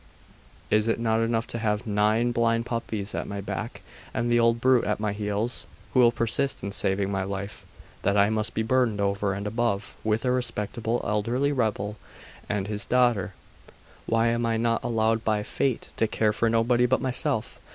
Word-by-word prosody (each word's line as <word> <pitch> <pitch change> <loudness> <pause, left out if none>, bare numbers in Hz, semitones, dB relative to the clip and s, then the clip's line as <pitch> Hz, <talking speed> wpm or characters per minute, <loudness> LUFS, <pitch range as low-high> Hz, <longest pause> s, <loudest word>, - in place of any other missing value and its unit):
Is 110 +1 +3
it 115 - +1
not 110 -1 +1
enough 115 0 0
to 115 - -5
have 105 0 -1
nine 110 +3 +2
blind 115 0 +1
puppies 110 -4 -3
at - - -3
my 100 0 -5
back, 100 - -5 0.3
and 120 +1 0
an 120 - +4
old 115 0 +3
brute 130 0 +4
at 105 0 -1
my 105 -1 -1
heels, 105 +3 -2 0.3
who 130 - +3
will 120 -1 +6
persist 120 +4 0
in 100 - -3
saving 95 0 +1
my 95 -1 -1
life, 100 +1 -6 0.3
that 100 +1 +1
I 100 +1 +4
must 110 +1 -1
be 110 - +1
burdened 115 -2 +1
over 100 -1 0
and 100 +1 -5
above 105 -2 -1
with 110 +2 0
a 125 - +2
respectable 120 -1 -1
elderly 115 +7 0
rebel 110 -5 -1 0.5
and 100 -2 -1
his 105 0 -4
daughter? 120 -7 +2 0.7
Why 115 +1 +2
am 115 0 0
I 115 -1 +1
not 115 0 0
allowed 115 -1 +1
by 105 -1 +1
fate 130 +2 -2
to 110 - +2
care 110 0 +1
for 115 +2 +1
nobody 120 +2 +3
but 130 - +2
myself? 130 -2 -1
115 Hz, 185 wpm, -26 LUFS, 105-120 Hz, 0.7 s, will